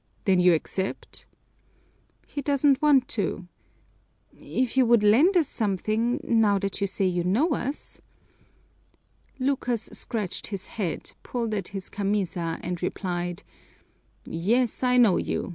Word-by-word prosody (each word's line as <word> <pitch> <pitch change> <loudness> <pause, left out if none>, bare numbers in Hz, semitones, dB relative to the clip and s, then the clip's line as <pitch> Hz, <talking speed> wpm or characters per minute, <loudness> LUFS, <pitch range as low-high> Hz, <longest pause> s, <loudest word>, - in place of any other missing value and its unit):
"Then 190 -3 +4
you 180 -1 +5
accept?" 190 +4 -5 1.0
"He 285 - -5
doesn't 280 0 +2
want 280 -4 +4
to! 200 -4 -2 0.9
If 255 -1 -2
you 265 - +5
would 235 -2 +4
lend 280 - +5
us 320 -5 +3
something, 215 +3 0
now 220 -3 +3
that 195 0 -3
you 200 - +2
say 195 0 -1
you 175 -1 0
know 230 - +2
us 280 +1 -4 0.7
" - - -38
Lucas 245 -5 -1
scratched 210 -6 -4
his 195 -3 -5
head, 200 -8 -4
pulled 230 -3 -3
at 195 -4 -2
his 195 -2 -6
camisa, 190 -5 -2
and 175 -1 -4
replied, 175 -1 -3 0.8
"Yes, 225 +8 0
I 250 -1 +3
know 230 -7 +5
you. - - -2
210 Hz, 135 wpm, -26 LUFS, 185-250 Hz, 1.0 s, you